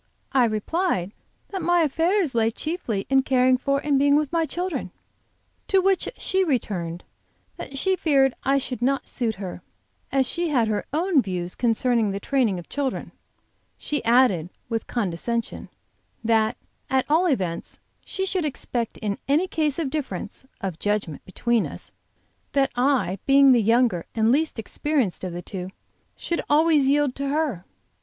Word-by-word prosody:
I 260 -3 +4
replied 215 - -1 0.4
that 385 -2 -4
my 350 +1 +3
affairs 325 +2 +1
lay 225 -1 +2
chiefly 240 - -3
in 270 0 +4
caring 255 -1 +3
for 275 +2 0
and 285 -2 +2
being 285 +1 +4
with 295 -2 +1
my 335 -1 +1
children; 360 +2 -3 0.8
to 390 - +3
which 385 0 +2
she 380 0 +1
returned 185 - -2 0.5
that 275 - -7
she 380 +6 +2
feared 275 -7 +3
I 275 +1 +3
should 255 -3 -4
not 275 +3 0
suit 230 -4 -1
her, 190 -2 -7 0.5
as 270 -1 +2
she 340 +4 -1
had 245 -6 +2
her 210 -1 -2
own 325 0 +2
views 180 -4 -4
concerning 235 -1 +1
the 195 0 -3
training 235 -4 +1
of 175 - -8
children. 280 -3 -3 0.7
She 295 -2 -3
added, 230 -8 +3 0.2
with 225 -1 -2
condescension, 230 +2 -3 0.5
that 225 +1 +2 0.3
at 265 -1 +2
all 325 +5 +3
events 185 - -2 0.3
she 385 - -3
should 370 -2 -1
expect 245 -5 -3
in 205 -2 -3
any 295 +6 +3
case 305 -5 0
of 310 -6 -2
difference 260 -5 -5
(of 185 -5 -4
judgment) 205 -7 -2
between 235 +4 0
us, - - -10 0.6
that 275 -1 +2
I, 245 -7 +1
being 275 0 +7
the 240 -2 +5
younger 225 -5 +2
and 220 0 +3
least 305 +2 +1
experienced 250 - -1
of 185 - -3
the 175 +1 -6
two, 185 -2 -6 0.5
should 340 - -2
always 300 -2 +4
yield 285 -2 +2
to 280 0 -2
her. 280 - -1
260 Hz, 160 wpm, -24 LUFS, 220-300 Hz, 0.8 s, being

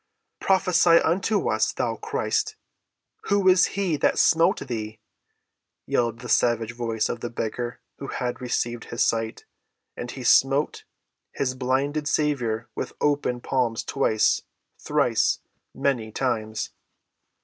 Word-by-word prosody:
"Prophesy 180 -3 +4
unto 190 +6 +1
us, - - +1
thou - - -1
Christ. - - -1 0.7
Who 200 -1 +2
is 185 0 +6
he 185 -6 +1
that - - +2
smote 165 0 +4
thee?" 110 -2 -5 0.9
yelled 115 0 0
the 125 - -7
savage 115 -1 +2
voice 115 -2 -1
of 120 - -4
the 120 - -4
beggar 120 +1 -4 0.2
who 140 - -6
had 125 -1 -3
received 120 -1 -2
his 120 - 0
sight; 115 -1 -1 0.5
and 120 - -6
he 130 0 -7
smote 135 +4 +3 0.5
his 130 -2 -1
blinded 135 +4 -1
Saviour 125 -8 0
with - - -5
open 145 -4 0
palms 120 -4 0
twice—thrice—many 110 +2 -1
times. 110 -4 -2
125 Hz, 115 wpm, -25 LUFS, 115-150 Hz, 0.9 s, is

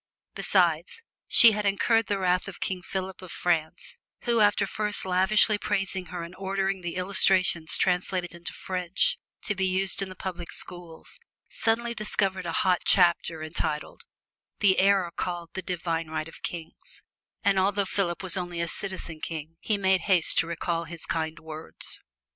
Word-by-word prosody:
Besides, 475 -2 +1 0.2
she 235 - +9
had 210 0 -2
incurred 225 +3 +2
the 205 - 0
wrath 180 0 +1
of 195 - -8
King 185 -1 -3
Philippe 190 0 -5
of 180 - -9
France, 165 -3 -2 0.2
who 235 -1 +1
after 205 -1 +4
first 210 -2 0
lavishly 190 +3 +3
praising 195 -3 -2
her 175 -2 -6
and 170 +2 -9
ordering 195 0 -2
the 175 -1 -5
"Illustrations" 185 -3 +3
translated 180 -1 0
into 170 -1 -6
French, 180 -1 0 0.2
to 205 - 0
be 190 -1 0
used 190 +1 +2
in 195 - -3
the 185 - -9
public 180 -3 -6
schools, 175 - -7 0.3
suddenly 235 +1 0
discovered 195 -4 -1
a - - -2
hot 180 -2 +3
chapter 170 -3 +3
entitled, 155 -1 -3 0.5
"The 195 -3 +4
Error 195 -3 +3
Called 175 -2 -4
the 190 - -4
Divine 165 -2 -3
Right 155 0 -4
of 165 - -13
Kings," 165 -2 -8 0.4
and 200 -2 +3
although 200 +1 +1
Philippe 190 -2 -1
was 185 0 -1
only 175 -2 -4
a 170 - -1
"citizen 170 -3 -5
king" 160 0 -6
he 215 - 0
made 190 -1 +2
haste 185 -5 +4
to 165 - +1
recall 170 0 -2
his 165 0 -6
kind 160 0 -2
words. 160 0 -7
185 Hz, 165 wpm, -27 LUFS, 170-195 Hz, 0.5 s, she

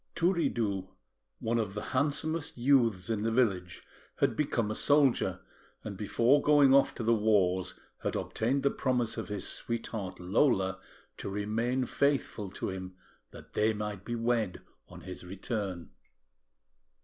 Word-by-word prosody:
Turiddu, 120 - 0 0.5
one 115 -1 0
of 105 -3 -2
the 105 - -5
handsomest 145 +3 -1
youths 120 -8 +3
in 110 -2 -1
the 115 - +1
village, 100 -7 0 0.3
had - - +1
become 120 -7 0
a - - 0
soldier, 140 0 +2 0.4
and 105 -2 -5
before 115 +7 +3
going 145 -2 +5
off 140 0 +4
to 120 - -4
the 115 +1 +3
wars, 95 -4 +2 0.3
had - - -2
obtained 130 +5 -1
the 140 - +3
promise 125 -3 0
of 110 -5 -4
his 100 -1 -4
sweetheart, 110 -4 -4
Lola, 95 0 +2 0.4
to - - -5
remain 115 +6 -1
faithful 135 -7 0
to 95 - -4
him, 95 -1 -7 0.3
that - - -14
they 110 +1 +2
might 105 -2 -5
be 120 - -3
wed 115 -4 0 0.3
on - - -12
his 90 -1 -8
return. 95 -1 -4
110 Hz, 145 wpm, -30 LUFS, 95-130 Hz, 0.5 s, going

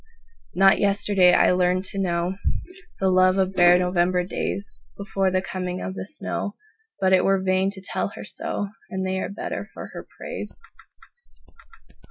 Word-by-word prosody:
Not 195 +1 +5
yesterday 195 -2 +4
I - - +5
learned 180 +1 +2
to 195 - -5
knowThe 175 -1 0 0.8
love 185 +1 +4
of 190 0 +1
bare 175 -1 +6
November 180 0 +1
daysBefore 195 0 -3
the 185 0 0
coming 180 -1 -4
of 190 - -4
the 190 - -6
snow, 205 0 -4 0.4
But 190 -1 +3
it 185 - +5
were 195 0 +3
vain 190 0 +1
to 195 -1 -5
tell 185 - -2
her - - -8
so, 205 -1 -4 0.2
And 190 -2 -3
they 190 0 -1
are - - -3
better 200 - -5
for - - -8
her - - -8
praise. - - -6
185 Hz, 155 wpm, -24 LUFS, 180-195 Hz, 0.8 s, bare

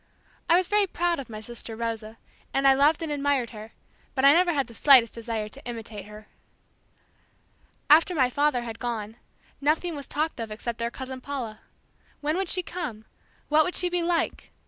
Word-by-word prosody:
I 335 - +7
was 365 0 +3
very 415 -1 +3
proud 345 -2 0
of 265 - -7
my 215 -1 -7
sister 230 0 -6
Rosa, 225 -1 -4 0.4
and 275 0 +3
I 270 - +8
loved 295 +5 +3
and 315 - -3
admired 280 -4 0
her, 215 0 -10 0.4
but 265 0 +2
I 280 - +9
never 350 +2 +4
had 280 -4 0
the 235 - -14
slightest 250 -2 +6
desire 225 -2 -4
to 275 +6 -11
imitate 225 -4 -7
her. 210 0 -12 1.6
After 325 +4 +6
my 260 -5 +4
father 285 -1 +1
had 230 -1 -7
gone, 225 -2 -4 0.4
nothing 320 +4 +1
was 285 -1 -7
talked 310 -1 -2
of 225 -1 -4
except 230 +2 -5
our 235 - 0
cousin 260 +1 -7
Paula. 250 -6 -5 0.6
When 300 +1 -1
would 380 -1 -1
she 365 - +1
come? 295 -13 -6 0.4
What 305 +1 +5
would 360 - -2
she 360 - +1
be 355 0 0
like? 340 -1 -1
270 Hz, 190 wpm, -26 LUFS, 230-315 Hz, 1.6 s, I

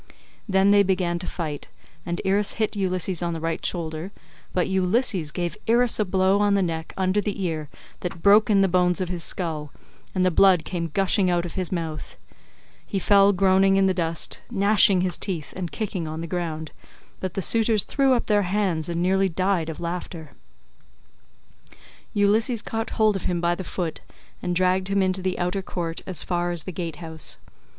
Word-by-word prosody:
Then 190 +1 +4
they 205 0 +6
began 180 -3 0
to 180 - -5
fight, 155 -5 -5 0.4
and 175 0 -2
Irus 200 +2 +1
hit 215 -1 -1
Ulysses 185 -3 -1
on 170 -1 -1
the 165 - -4
right 165 0 -3
shoulder; 165 +1 -3 0.4
but 180 - 0
Ulysses 190 - +1
gave 175 +1 -3
Irus 235 +1 +3
a 215 - +2
blow 190 +1 +2
on 205 -1 +3
the 195 - +2
neck 160 -2 -3
under 190 +2 +1
the 200 -1 -3
ear 155 -4 -3 0.3
that 170 -2 -6
broke 210 +3 +6
in 200 -2 +4
the 195 - +4
bones 180 0 +2
of 185 -2 -2
his 175 -2 -3
skull, 155 -5 -3 0.4
and 185 -1 +2
the 185 - +3
blood 185 -1 +4
came 170 -3 -3
gushing 195 +1 +2
out 175 -1 +1
of 175 - -6
his 185 -2 -3
mouth; 165 -4 -4 0.7
he 200 - -4
fell 200 +1 +5
groaning 195 0 +3
in 195 0 +4
the 190 - +3
dust, 165 -2 -2
gnashing 200 -3 +4
his 180 -1 -1
teeth 170 -7 -4
and 180 -3 -4
kicking 195 -7 -3
on 155 +1 -5
the - - -4
ground, 160 -2 -4 0.5
but 185 -2 -4
the 195 - -1
suitors 225 -1 +4
threw 275 -2 +2
up 240 - 0
their 210 -1 +3
hands 185 -4 -1
and 170 0 -1
nearly 190 +1 +2
died 185 -1 0
of 160 - -6
laughter, 170 -2 -5 1.4
as - - -19 0.4
Ulysses 215 +3 +2
caught 225 0 -3
hold 215 -2 +3
of 195 - -4
him 175 -1 0
by 170 0 +1
the 185 - -5
foot 175 -2 -4 0.4
and 180 0 -2
dragged 185 +1 +2
him 195 0 +1
into 185 0 +1
the 185 0 -2
outer 180 +2 -1
court 170 -3 -5
as 185 -3 0
far 175 -1 -1
as 175 -2 -3
the 185 - -6
gate 165 -2 -5
house. 160 -1 -6
185 Hz, 195 wpm, -24 LUFS, 170-195 Hz, 1.4 s, they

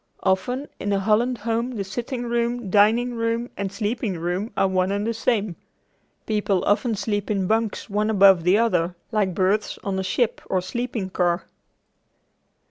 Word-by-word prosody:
Often 245 +9 0
in 205 - -2
a 195 - +2
Holland 225 +5 +2
home 230 +3 -2
the 200 - -2
sitting 240 +5 -4
room, 235 -3 -1
dining 225 +5 +4
room 230 +1 -1
and 200 -1 -3
sleeping 205 -1 -2
room 180 +6 -2
are 195 - +3
one 185 0 +1
and 205 +1 -1
the 230 - 0
same. 215 -5 0 0.7
People 205 -3 0
often 220 +2 +2
sleep 205 0 -2
in 195 -3 0
bunks 220 +1 0
one 210 0 0
above 195 -4 +6
the 180 +4 +4
other 180 -6 +1 0.2
like 200 -5 0
berths 200 +3 +1
on 195 -1 -2
a - - -1
ship 220 +5 0
or 185 - +1
sleeping 220 0 -4
car. 175 -1 0
210 Hz, 165 wpm, -23 LUFS, 190-230 Hz, 0.7 s, above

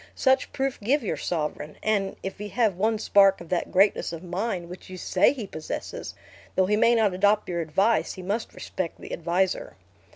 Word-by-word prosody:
Such 265 -1 +2
proof 270 -1 -2
give 260 +7 +1
your 210 - -1
sovereign; 150 -2 -3
and, 205 -3 0
if 195 +1 -5
he 210 - -4
have 215 -1 +1
one 220 +4 +1
spark 195 -2 +5
of 170 - -11
that 180 - -1
greatness 195 -1 +3
of 165 +1 -7
mind 180 0 -3
which 180 +2 -11
you 185 - -7
say 185 +1 +3
he 255 -6 -5
possesses, 155 -5 -6 0.4
though 190 - +4
he 210 +3 +2
may 230 +2 +4
not 215 -4 +3
adopt 205 +3 +2
your 170 -1 -1
advice, 195 +8 +1
he 185 - -9
must 210 +5 -3
respect 180 -3 -5
the - - -8
adviser." 175 +3 -1
195 Hz, 195 wpm, -26 LUFS, 180-215 Hz, 0.4 s, spark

